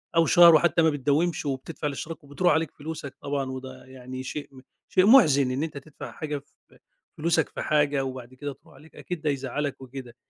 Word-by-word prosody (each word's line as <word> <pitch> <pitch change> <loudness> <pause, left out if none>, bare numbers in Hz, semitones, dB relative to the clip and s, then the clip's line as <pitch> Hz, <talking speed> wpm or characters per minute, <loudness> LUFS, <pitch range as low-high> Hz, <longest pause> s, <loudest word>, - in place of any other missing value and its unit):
أو 165 0 +5
شهر 170 -1 +8
وحتى 170 +1 +3
ما 160 - +5
بتداومش 150 +4 0
وبتدفع 145 +3 -4
الاشتراك 155 +3 -6
وبتروح 150 +4 +1
عليك 160 -1 0
فلوسك 150 -2 -7
طبعًا 140 -1 -2
وده 130 0 -8
يعني 130 0 -8
شيء 145 +2 -6
م 130 -1 -14 0.3
شيء 185 0 +4
مُحزِن 150 - +6
إن 135 +4 -1
أنت 155 -3 -5
تدفع 140 +1 -10
حاجة 150 -1 -4
ف 140 - -18 0.4
فلوسك 160 0 +1
في - - -6
حاجة 145 -2 +1
وبعد 130 -1 -7
كده 145 +2 -6
تروح 155 +4 -22
عليك، 160 - -18
أكيد 180 -3 -6
ده 155 - 0
يزعلك 140 +1 -3
وكده. 130 -2 -9
145 Hz, 190 wpm, -26 LUFS, 135-160 Hz, 0.4 s, شهر